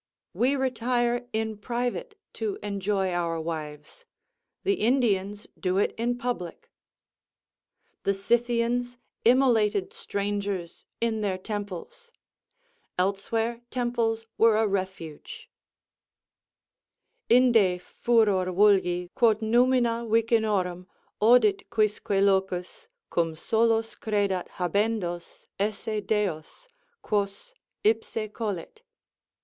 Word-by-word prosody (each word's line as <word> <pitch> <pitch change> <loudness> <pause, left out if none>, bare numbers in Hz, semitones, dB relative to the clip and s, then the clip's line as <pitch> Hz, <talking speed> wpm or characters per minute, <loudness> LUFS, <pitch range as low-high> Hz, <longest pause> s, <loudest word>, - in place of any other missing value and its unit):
We 260 +4 +2
retire 245 -2 0
in 220 -1 -2
private 245 - -3 0.2
to 410 -2 -3
enjoy 195 -1 -1
our 170 -2 -1
wives; 155 - -6 0.6
the 395 - +2
Indians 210 - +1
do 185 -1 0
it 200 - +2
in 240 +2 -1
public. 240 -9 -5 1.3
The 200 - 0
Scythians 240 +3 0 0.3
immolated 225 -6 +3
strangers 200 -3 -4
in 225 -2 0
their 195 -3 -1
temples; 205 - -7 0.9
elsewhere 225 +5 -1
temples 235 -2 -1
were 225 -1 +5
a 220 - +3
refuge: 190 -6 -5 1.8
Inde 230 -7 +5
furor 205 -3 +1
vulgi, 180 -2 +3
quod 225 -2 +3
numina 235 0 +2
vicinorum 215 -6 +1 0.3
Odit 250 - +4
quisque 215 -1 0
locus, 195 - 0 0.2
cum 165 -2 0
solos 225 +5 +1
credat 200 -4 -1
habendos 180 -1 -2
Esse 210 +1 -2
deos, 205 - -2 0.4
quos 205 - -2 0.3
ipse 220 0 0
colit. 215 - -5
215 Hz, 90 wpm, -27 LUFS, 190-235 Hz, 1.8 s, were